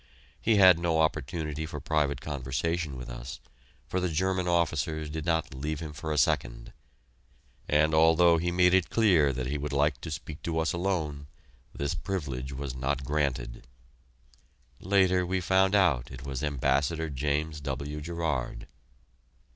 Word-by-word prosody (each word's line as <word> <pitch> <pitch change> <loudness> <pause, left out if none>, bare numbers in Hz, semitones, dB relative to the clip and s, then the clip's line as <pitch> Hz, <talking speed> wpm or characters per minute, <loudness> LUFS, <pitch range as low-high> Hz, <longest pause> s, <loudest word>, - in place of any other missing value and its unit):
He 115 - +3
had 95 -4 +7
no 85 -2 +1
opportunity 75 0 -1
for 80 - -6
private 70 -4 0
conversation 70 +2 -2
with 60 - -7
us, - - -7 0.5
for 95 - -2
the 90 -1 0
German 90 +3 0
officers 80 -2 0
did 80 0 -4
not 80 -4 0
leave 75 +3 -3
him 80 -2 -6
for 80 +2 -5
a 75 - -1
second; - - 0 1.0
and 75 +1 +3
although 80 +2 +5
he 90 +1 -1
made 90 0 +4
it 95 -2 +3
clear 90 -11 +4
that 65 -1 -3
he 70 +3 -2
would 75 0 -4
like 70 0 +1
to - - -6
speak 75 0 -7
to 80 -1 -3
us 80 0 +1
alone 80 -6 -2 0.4
this 70 0 -2
privilege 70 -5 -4
was 70 -1 -5
not 65 +2 -2
granted. 65 -5 -2 1.1
Later 95 -1 +3
we 95 +1 -1
found 95 +2 +3
out 80 -12 +3
it 65 +1 -9
was 70 -1 -4
Ambassador 75 +3 0
James 75 +2 -2
W. 70 +2 -4
Gerard. 75 -7 -3
75 Hz, 155 wpm, -28 LUFS, 70-85 Hz, 1.1 s, had